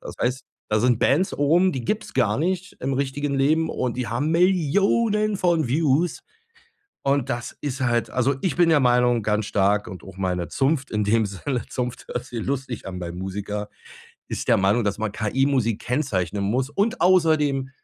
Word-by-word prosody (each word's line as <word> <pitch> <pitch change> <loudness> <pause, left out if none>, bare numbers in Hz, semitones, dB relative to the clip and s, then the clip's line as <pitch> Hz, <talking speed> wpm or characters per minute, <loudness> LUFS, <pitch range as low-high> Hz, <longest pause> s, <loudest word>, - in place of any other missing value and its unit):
Das - - -8
heißt, 125 +2 0 0.3
da 105 0 +2
sind 120 -2 +3
Bands 175 +8 +2
oben, 170 +6 +3
die 125 -3 -4
gibt's 215 - -3
gar 110 -5 +2
nicht 185 +4 -2
im 135 +1 -1
richtigen 140 +1 -2
Leben 155 +4 +2
und 125 -1 -2
die 125 -1 -2
haben 140 +7 -1
Millionen 200 +5 +2
von 170 -7 +1
Views. 155 +3 +1 0.8
Und 140 -1 0
das 120 -1 -4
ist 140 -2 -3
halt 120 -2 0
also 130 +2 +1
ich 180 -5 -1
bin 175 -1 +4
der 150 -3 +5
Meinung 120 -2 +3
ganz 105 0 0
stark 100 +1 +1
und 90 0 -9
auch 95 -1 -12
meine 90 -2 -2
Zunft 135 0 0
in 105 -1 0
dem 110 +1 +2
Sinne, 115 +6 -3
Zunft 125 -1 -4
hört 120 - -4
sich 120 -4 -5
lustig 130 -5 -4
an 90 -1 -6
beim 85 0 -6
Musiker, 100 +2 -4 0.6
ist - - -4
der - - +5
Meinung, 100 +4 +2
dass 100 0 -1
man 110 -1 -2
KI-Musik 120 0 0
kennzeichnen 105 - -1
muss. 125 +7 0
Und 200 +9 -1
außerdem 155 -7 +3
130 Hz, 180 wpm, -23 LUFS, 110-155 Hz, 0.8 s, der